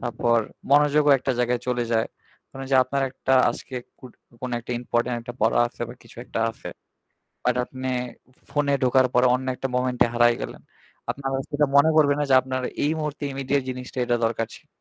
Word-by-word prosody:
তারপর 120 0 +1 0.3
মনোযোগও 150 0 +5
একটা 130 +1 -1
জায়গায় 120 0 +1
চলে 120 -1 0
যায়। 110 0 +2 0.5
মানে 135 0 -7
যে 135 - +5
আপনার 140 +1 -1
একটা 130 0 -2 0.2
আজকে 130 - -8 0.2
কুট 130 -3 -12 0.3
কোন 125 - -4
একটা 120 - -6
ইম্পোর্টেন্ট 120 0 -1
একটা 120 +1 -8
পড়া 110 +1 +3
আছে 120 - -15
বা 120 - -9
কিছু 115 - -17
একটা 115 - -4
আছে। 115 - -10 0.8
আর - - +3
আপনে 130 +1 -6 0.6
ফোনে 145 -1 +1
ঢোকার 130 0 +4
পরে 125 +1 +5
অন্য 130 +1 -2
একটা 135 +1 -3
মোমেন্ট 125 -1 0
এ - - -4
হারায় 120 0 +4
গেলেন। - - -6 0.5
আপনার 135 -1 -4
আর 135 - -2
সেটা 150 0 +2
মনে 145 +3 +6
পড়বে 145 -2 +5
না - - +1
যে 130 - +6
আপনার 130 0 -3 0.2
এই 150 - +2
মুহূর্তে 150 -1 -4
ইমিডিয়েট 135 0 0
জিনিসটা 125 0 -7
এটা 120 0 +1
দরকার 115 0 -1
ছিল। - - -15
130 Hz, 195 wpm, -24 LUFS, 120-140 Hz, 0.8 s, মনে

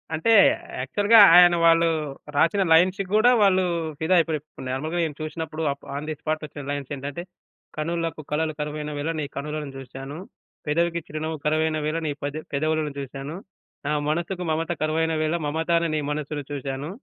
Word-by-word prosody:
అంటే 225 +9 +1 0.5
యాక్చువల్‌గా 205 - +4 0.2
ఆయన 175 -1 +8
వాళ్ళు 165 0 +5 0.5
రాసిన 195 +5 +3
లై‌న్స్‌‌కి 185 +4 +4
గూడా 230 +4 +6
వాళ్ళు 190 -2 +4 0.4
ఫిదా 170 +4 +2
అయిపోయి. 160 -2 0
ఇపుడు 150 -3 -12
నార్మల్‌గా 155 +6 -3
నేను 150 -3 -3
చూసినప్పుడు 160 0 -4
అప్ 140 - -19
ఆన్ 150 +2 -5
ది 155 - -3
స్పాట్ 155 0 -2
ఒచ్చిన 145 -1 -9
లైన్స్ 145 -1 -4
ఏంటంటే, 140 +5 -6 0.5
"కనులకు 165 0 -2
కళలు 155 +1 0
కరువైన 150 0 -4
వేళ 155 +3 -2
నీ 145 - -2
కనులను 150 0 -4
జూసాను. 135 +3 -8 0.5
పెదవికి 170 +2 +1
చిరునవ్వు 155 +1 -4
కరువైన 155 +1 +1
వేళ 155 +2 -1
నీ - - 0
పెద 145 0 -2 0.2
పెదవులను 155 +1 0
జూసాను. 140 +3 -6 0.5
నా 150 - 0 0.2
మనసుకు 175 +3 -2
మమత 165 +2 -1
కరువైన 160 +1 +1
వేళ 155 +2 0
మమత 160 +3 -2
అనే 165 0 +1
నీ - - +1
మనస్సుని 150 0 -3
చూసాను. 140 +1 -4
155 Hz, 160 wpm, -24 LUFS, 150-165 Hz, 0.5 s, ఆయన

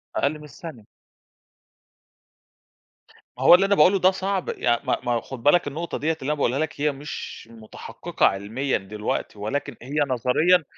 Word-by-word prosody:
أقَل 150 +2 0
من - - -13
الثانية. 150 -6 -10 2.5
ما 130 - -5
هو 175 - +9
اللي 195 +2 +3
أنا 200 0 +3
باقوله 190 +5 +5
ده 185 +1 +5
صعب 190 0 -2
يع 120 0 +1
ما - - 0
ما 120 -1 0
خُد 120 0 -9
بالك 150 +1 +4
النقطة 165 +4 -4
دِيّة 155 +2 0
اللي 135 - -3
أنا 150 - +2
باقولها 140 -2 0
لك 155 -2 -3
هي 150 0 +2
مش 140 -4 -8
متحقِّقة 110 -1 -4
عِلميًا 110 +8 0
دلوقتي 105 +1 -4
ولكن 135 +6 -3
هي 135 +5 -7
نظريًا 140 +8 +3
145 Hz, 160 wpm, -24 LUFS, 120-165 Hz, 2.5 s, هو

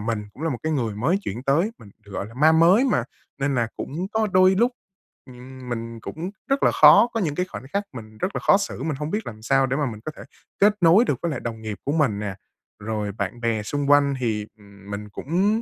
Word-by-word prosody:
mình 105 -1 -2
cũng 140 - -11
là 165 - 0
một 125 - -3
cái 160 - -1
người 120 -8 -1
mới 145 - +1
chuyển 120 - -5
tới, 150 +10 +2
mình, 100 - -14
gọi 100 -1 -5
là, 115 - -13
ma 155 +5 +5
mới 170 +9 +5
mà, 125 - +1 0.3
nên 140 0 0
là 120 -3 +1
cũng 170 +7 -4
có 220 0 +1
đôi 185 +1 +5
lúc, 235 +6 +3 0.6
ừm, 130 0 -11
mình 115 -1 -5
cũng 170 - -6 0.2
rất 275 0 +1
là - - +5
khó - - +7
có 225 - 0
những 155 -8 -1
cái 180 - 0
khoảnh 185 - -9
khắc 200 - 0
mình 110 -3 -10
rất 185 - -3
là - - 0
khó - - +5
xử, 195 -9 -4
mình 155 -1 -1
hông 150 - -3
biết 210 +1 -3
làm 110 -1 -8
sao 135 +4 +3
để 130 +1 -1
mà 150 - +1
mình 110 - -9
có 155 - -3
thể - - -11 0.4
kết 205 +1 +5
nối 175 +8 +6
được - - +1
với 170 -2 -1
lại 130 - -3
đồng 115 -2 -6
nghiệp 110 -2 -5
của 140 - 0
mình 140 -10 +1
nè. 100 -2 -4 0.4
Rồi 105 -1 -3
bạn 100 +3 -5
bè 115 -2 0
xung 145 +5 -2
quanh 145 -1 +5
thì, 110 -4 -2
ừm, 100 -1 -16
mình 105 +1 -6
cũng 190 - 0
135 Hz, 255 wpm, -23 LUFS, 110-170 Hz, 0.6 s, khó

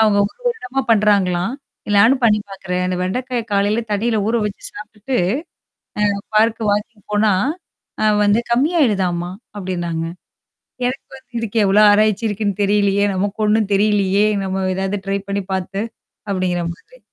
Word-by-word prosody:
அவங்க 215 -2 +4
1 - - -10
வருடமா 270 - -2
பண்றாங்களாம். 200 -2 +3 0.5
நானும் 250 +5 +5
பண்ணி 210 -2 +5
பாாக்குறேன். 180 -2 -3
அந்த 185 0 -1
வெண்டைக்காய 245 +6 -2
காலையில 205 +3 +2
தண்ணியில 220 +2 +1
ஊற 235 - +1
வச்சு 210 -1 -5
சாப்ட்டுட்டு 215 +4 -5 1.0
அ - - -5 0.2
பார்க்குக்கு 220 0 +2
வாக்கிங் 210 +1 -3
போனா, 210 0 +3 0.7
அ - - +3 0.2
வந்து 205 +2 +4
கம்மியாயிடுதாமா, 210 - +1 0.3
அப்படின்னாங்க. 175 -4 -3 0.8
எனக்கு 260 +2 -5
வந்து 260 - -22
"இதுக்கு 230 0 -4
எவ்வளோ 200 +2 +4
ஆராய்ச்சி 215 +1 +3
இருக்குன்னு 205 -1 -2
தெரியலையே! 200 0 +2
நமக்கு 200 +3 -2
ஒண்ணும் 210 -1 +2
தெரியலையே, 205 0 +3 0.2
நம்ம 190 0 -2
ஏதாவது 195 +1 -2
ட்ரை 195 - +1
பண்ணி 200 0 -1
பார்த்து." 190 +1 -3 0.5
அப்படிங்கிற 185 -2 0
மாதிரி. - - -20
205 Hz, 135 wpm, -19 LUFS, 195-225 Hz, 1.0 s, நானும்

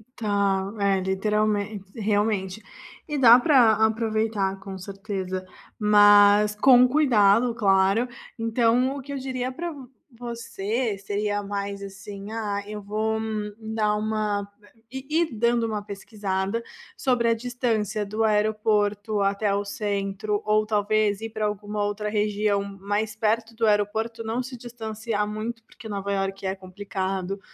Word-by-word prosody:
Tá, 200 -2 0
é 195 -1 +2
literalmente 210 +1 0 0.2
realmente, 205 -1 0 0.5
e 295 -1 -2
dá 245 -2 +8
pra 245 -6 +5
aproveitar 220 -3 0
com 190 0 -8
certeza, 190 -1 -5 0.4
mas 205 0 +6
com 250 +2 +6
cuidado, 240 -5 +4
claro. 195 +2 +3 0.3
Então, 235 +3 +2
o 275 - -6
que 280 - -10
eu - - -3
diria 260 -1 -3
pra 340 +5 -5 0.4
você 235 -2 -3
seria 205 +1 -2
mais, 200 0 -4
assim: 195 +1 -8
"Ah 205 -3 -3
eu 210 0 -6
vou", 215 +2 -1
hum 215 -1 -3
dar 220 -1 0
uma 210 -1 -1 0.4
ir 265 0 -6
ir 325 +1 +2
dando 235 +1 +2
uma 210 -2 -3
pesquisada, 200 +1 -3 0.3
sobre 245 -3 +1
a - - +4
distância 225 -3 -1
do 215 +2 -2
aeroporto 210 -1 +1
até 200 +1 +1
o 200 0 -1
centro 200 0 -2
ou 215 0 +3
talvez 210 0 +1
ir 225 - -4
para 215 -1 -2
alguma 210 0 -3
outra 205 +1 -2
região 210 -1 0 0.2
mais 210 +2 -1
perto 225 +1 0
do 225 0 0
aeroporto. 220 +2 0
Não 230 +3 -2
se 255 0 -8
distanciar 220 -2 -4
muito, 225 +2 -5
porque 225 0 -12
Nova 200 -1 -3
Iorque 195 0 -2
é 190 - -1
complicado, 190 0 -4
210 Hz, 135 wpm, -25 LUFS, 200-225 Hz, 0.5 s, dá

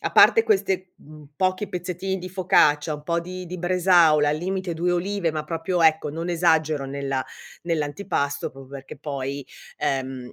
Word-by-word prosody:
a - - -3
parte 450 - +7
queste, 190 - 0
mhmm, 150 -1 -15
pochi 185 +5 0
pezzettini 180 +2 -3
di 185 0 -7
focaccia, 155 -5 +3
un 150 - -9
po' 170 +2 -1
di 180 +1 -7
di 180 +2 -6
bresaola, 175 -4 +4
al 150 - +1
limite 185 +1 -3
2 175 +2 0
olive, 185 0 -1
ma 155 -1 -3
proprio, 165 +2 -1
ecco, 160 -2 +3
non 165 +3 -5
esagero 160 -4 +2
nella 135 -1 -3 0.4
nell'antipasto, 145 -3 -2
proprio 135 0 -14
perché 135 -1 -9
poi, 140 -1 -5 0.3
ehm, 130 -3 -3
165 Hz, 165 wpm, -24 LUFS, 145-180 Hz, 0.4 s, parte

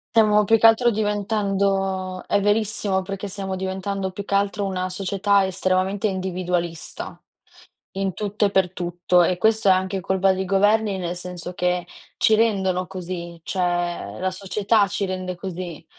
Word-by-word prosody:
Stiamo 210 -2 +5
più 225 +1 +5
che 225 - +2
altro, 225 +2 +6
diventando 195 -3 -1
è 205 - +2
verissimo, 205 -2 +1
perché 195 +1 -5
stiamo 195 -1 -4
diventando, 190 +1 -3
più 200 +2 -6
che 200 - -5
altro 200 0 0
una 185 -1 -2
società 195 +1 +1
estremamente 190 +2 0
individualista, 180 -3 -3 0.7
in 195 -1 -1
tutto 210 +1 -1
e 200 - +1
per 190 -2 +2
tutto. 175 0 +1
E 180 +1 +1
questo 220 +1 +2
è 190 - +8
anche 190 +1 +1
colpa 190 +1 +2
dei 190 0 -2
governi, 205 +1 +2
nel 175 0 -3
senso 180 0 -5
che 180 0 0 0.3
ci 220 - +4
rendono 190 -5 +1
così. 175 -2 -6
Cioè 175 -1 -2
la 185 +1 -1
società 200 +2 +1
ci 200 +2 -2
rende 185 -1 -4
così, 175 -3 -7
190 Hz, 155 wpm, -23 LUFS, 185-200 Hz, 0.7 s, è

